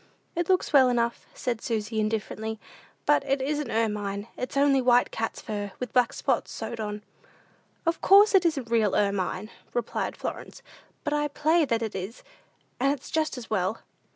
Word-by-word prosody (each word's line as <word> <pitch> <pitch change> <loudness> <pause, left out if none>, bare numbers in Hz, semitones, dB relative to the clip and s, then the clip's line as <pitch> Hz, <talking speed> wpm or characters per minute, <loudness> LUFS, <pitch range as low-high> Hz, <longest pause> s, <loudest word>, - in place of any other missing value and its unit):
"It 345 +1 -1
looks 370 -3 +2
well 265 -3 +7
enough," 235 -1 0
said 235 -3 -2
Susy, 220 -1 -2
indifferently, 220 0 -2 0.5
"but 295 -1 +4
it 275 0 0
isn't 295 +2 -1
ermine; 210 -2 -1
it's 255 +2 -4
only 275 -1 +4
white 245 0 +4
cat's 225 - -3
fur, 205 -3 -4
with 250 - -5
black 250 -2 +4
spots - - -1
sewed 235 - -5
on," 210 -1 -4 0.8
"Of 330 0 0
course 405 +2 +7
it 380 -2 +6
isn't 280 -9 -1
real 220 -4 +3
ermine!" 200 0 0 0.2
replied 240 -2 -2
Florence; - - -6 0.4
"but 295 - -1
I 295 0 +1
play 310 +3 +2
that 230 -3 0
it 220 - -3
is, 190 +5 -6 0.6
and 270 +2 +3
it's 280 -2 -5
just 310 -3 0
as 235 -3 -9
well." 195 +1 0
235 Hz, 170 wpm, -27 LUFS, 215-285 Hz, 0.8 s, well